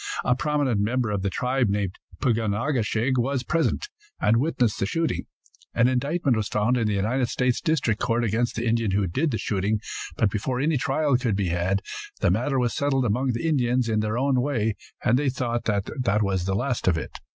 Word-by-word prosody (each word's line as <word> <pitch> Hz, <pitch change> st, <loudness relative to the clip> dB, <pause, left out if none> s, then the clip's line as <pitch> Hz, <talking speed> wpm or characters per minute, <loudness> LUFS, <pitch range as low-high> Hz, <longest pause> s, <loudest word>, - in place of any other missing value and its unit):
A 125 Hz, -, +3 dB
prominent 140 Hz, -6 st, 0 dB
member 120 Hz, +1 st, 0 dB
of 100 Hz, -2 st, -1 dB
the 100 Hz, -, 0 dB
tribe 125 Hz, +4 st, 0 dB
named 100 Hz, -2 st, -2 dB, 0.2 s
Pug 115 Hz, -3 st, +2 dB
on 105 Hz, -3 st, 0 dB
a 130 Hz, +8 st, -1 dB
ke 120 Hz, -4 st, +1 dB
shig 120 Hz, +4 st, 0 dB
was 130 Hz, +1 st, 0 dB
present, 165 Hz, -, 0 dB, 0.3 s
and 115 Hz, -, +3 dB
witnessed 125 Hz, -5 st, +1 dB
the 95 Hz, -, 0 dB
shooting. 165 Hz, +6 st, -1 dB, 0.5 s
An 115 Hz, -, +4 dB
indictment 140 Hz, +2 st, +1 dB
was 110 Hz, -2 st, -1 dB
found 105 Hz, +4 st, +1 dB
in 115 Hz, -3 st, +1 dB
the 105 Hz, -, 0 dB
United 120 Hz, +6 st, +1 dB
States 125 Hz, -1 st, 0 dB
district 150 Hz, -10 st, 0 dB
court 115 Hz, +1 st, +1 dB
against 115 Hz, +2 st, 0 dB
the 115 Hz, -, -2 dB
Indian 115 Hz, -1 st, +1 dB
who 100 Hz, +1 st, +1 dB
did 135 Hz, -, 0 dB
the 115 Hz, -, -1 dB
shooting, 105 Hz, +1 st, 0 dB, 0.4 s
but 105 Hz, -3 st, +2 dB
before 125 Hz, +5 st, -2 dB
any 150 Hz, +2 st, +2 dB
trial 140 Hz, 0 st, +1 dB
could 120 Hz, -6 st, 0 dB
be 95 Hz, -3 st, 0 dB
had 90 Hz, +3 st, 0 dB, 0.4 s
the -, -, +3 dB
matter 140 Hz, -2 st, 0 dB
was 120 Hz, -2 st, +1 dB
settled 135 Hz, -2 st, +1 dB
among 125 Hz, +4 st, +1 dB
the 120 Hz, +8 st, -2 dB
Indians 125 Hz, -5 st, +2 dB
in 110 Hz, -1 st, +1 dB
their 110 Hz, +1 st, -1 dB
own 130 Hz, -1 st, +2 dB
way, 115 Hz, -6 st, 0 dB, 0.3 s
and 125 Hz, +4 st, +4 dB
they 145 Hz, -2 st, +1 dB
thought 120 Hz, -2 st, -2 dB
that 105 Hz, +1 st, 0 dB
was 95 Hz, -3 st, 0 dB
the 95 Hz, 0 st, 0 dB
last 125 Hz, +2 st, -1 dB
of 85 Hz, -3 st, +4 dB
it. 80 Hz, -, -6 dB
120 Hz, 215 wpm, -25 LUFS, 105-130 Hz, 0.5 s, An